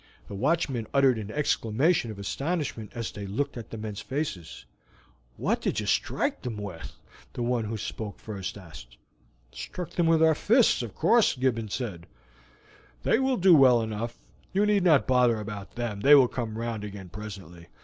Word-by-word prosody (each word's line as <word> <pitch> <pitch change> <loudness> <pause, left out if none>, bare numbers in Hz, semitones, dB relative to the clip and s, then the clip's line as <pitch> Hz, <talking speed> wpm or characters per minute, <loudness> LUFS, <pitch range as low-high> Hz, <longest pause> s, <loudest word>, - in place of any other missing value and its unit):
The - - -9
watchmen 130 0 0
uttered 135 -4 +4
an 105 -1 -6
exclamation 135 +2 +1
of 110 - -7
astonishment 135 - -3
as 115 -2 -4
they 100 -1 -7
looked 140 +9 -2
at 115 -3 -8
the 115 - -7
men's 105 -1 -6
faces. 135 - -5 0.7
"What - - 0
did - - -1
you - - -3
strike - - 0
them 120 -4 -5
with?" 100 -5 -7 0.4
the 120 - -3
one 120 -2 0
who 110 +1 -4
spoke 105 0 -6
first 100 -3 -6
asked. - - -13 0.5
"Struck 180 -2 -7
them 170 -2 +1
with 165 -1 +4
our 160 0 +6
fists, 225 - +3
of 115 -4 -7
course," 225 +8 +3
Gibbons 120 -4 -1
replied. 95 -9 -6 1.0
"They - - +3
will 265 -1 +1
do 185 -2 +6
well 130 -5 +7
enough; 110 +2 -4 0.3
you 200 +2 +2
need 205 -2 +2
not 155 -6 +5
bother 125 -3 +3
about 105 -2 -7
them, 120 -4 -3
they 140 +8 +7
will 135 -3 +6
come 115 -3 -4
round 115 -2 -3
again 100 -3 -8
presently. 95 -5 -9
115 Hz, 175 wpm, -27 LUFS, 105-145 Hz, 1.0 s, well